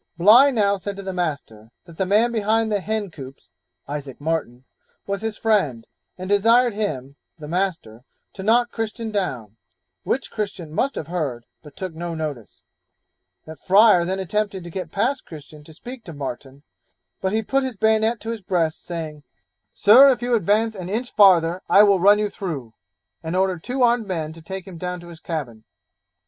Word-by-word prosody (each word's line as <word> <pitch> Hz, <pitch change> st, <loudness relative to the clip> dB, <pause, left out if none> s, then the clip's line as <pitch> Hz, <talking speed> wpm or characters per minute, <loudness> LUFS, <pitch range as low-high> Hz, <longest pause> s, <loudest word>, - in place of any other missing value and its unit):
Bligh 225 Hz, +10 st, +7 dB
now 205 Hz, -6 st, +1 dB
said 200 Hz, +1 st, -6 dB
to 200 Hz, -, -8 dB
the 190 Hz, 0 st, -4 dB
master, 140 Hz, -11 st, -4 dB, 0.2 s
that 170 Hz, -2 st, -15 dB
the 190 Hz, -, -1 dB
man 215 Hz, +5 st, +3 dB
behind 220 Hz, 0 st, +1 dB
the 205 Hz, -, +1 dB
hen 210 Hz, -1 st, -3 dB
coops 135 Hz, -, -12 dB, 0.4 s
(Isaac 140 Hz, -2 st, -6 dB
Martin) 145 Hz, -5 st, -3 dB, 0.4 s
was 200 Hz, 0 st, -3 dB
his 220 Hz, -1 st, -4 dB
friend, 155 Hz, -, 0 dB, 0.3 s
and 185 Hz, 0 st, -6 dB
desired 230 Hz, +4 st, +4 dB
him 145 Hz, -10 st, -4 dB, 0.2 s
(the 150 Hz, -2 st, -9 dB
master) 165 Hz, -, -3 dB, 0.3 s
to 190 Hz, -, -8 dB
knock 235 Hz, +4 st, +2 dB
Christian 225 Hz, 0 st, -4 dB
down, 125 Hz, -, -3 dB, 0.4 s
which 265 Hz, -, -2 dB
Christian 195 Hz, -7 st, -5 dB
must 275 Hz, +11 st, 0 dB
have -, -, -4 dB
heard, 145 Hz, -8 st, -4 dB, 0.2 s
but 150 Hz, -2 st, -15 dB
took 185 Hz, -3 st, -5 dB
no 170 Hz, +1 st, -5 dB
notice; 150 Hz, -8 st, -6 dB, 0.8 s
that 160 Hz, -2 st, -11 dB
Fryer 195 Hz, -2 st, +6 dB
then 185 Hz, +2 st, -2 dB
attempted 195 Hz, 0 st, -2 dB
to 170 Hz, -, -9 dB
get 180 Hz, -2 st, -6 dB
past 255 Hz, +7 st, -1 dB
Christian 150 Hz, -1 st, -12 dB
to 160 Hz, -, -14 dB
speak 240 Hz, +9 st, -10 dB
to 170 Hz, -, -8 dB
Martin, 135 Hz, 0 st, -7 dB, 0.6 s
but 190 Hz, -, 0 dB
he 220 Hz, +1 st, 0 dB
put 270 Hz, +5 st, 0 dB
his 255 Hz, -5 st, -4 dB
bayonet 220 Hz, +2 st, +2 dB
to 225 Hz, -, -4 dB
his 230 Hz, -2 st, -6 dB
breast, 175 Hz, -4 st, -1 dB
saying, 160 Hz, -3 st, -6 dB, 0.5 s
'Sir, 250 Hz, +7 st, +7 dB
if 245 Hz, -2 st, 0 dB
you 245 Hz, 0 st, 0 dB
advance 220 Hz, +1 st, +2 dB
an 185 Hz, -3 st, -7 dB
inch 235 Hz, +5 st, -3 dB
farther, 180 Hz, -3 st, +5 dB
I 205 Hz, -, +7 dB
will 200 Hz, -2 st, +4 dB
run 200 Hz, +3 st, +6 dB
you 210 Hz, -1 st, -1 dB
through,' 145 Hz, -, -6 dB, 0.5 s
and 160 Hz, +2 st, -4 dB
ordered 185 Hz, -3 st, 0 dB
two 255 Hz, +1 st, -1 dB
armed 235 Hz, -2 st, +2 dB
men 160 Hz, -4 st, -3 dB
to 165 Hz, -, -13 dB
take 190 Hz, +2 st, -7 dB
him 180 Hz, -4 st, -10 dB
down 180 Hz, 0 st, -4 dB
to 175 Hz, -, -12 dB
his 165 Hz, -2 st, -12 dB
cabin. 130 Hz, -11 st, -5 dB
190 Hz, 185 wpm, -22 LUFS, 160-215 Hz, 0.8 s, Bligh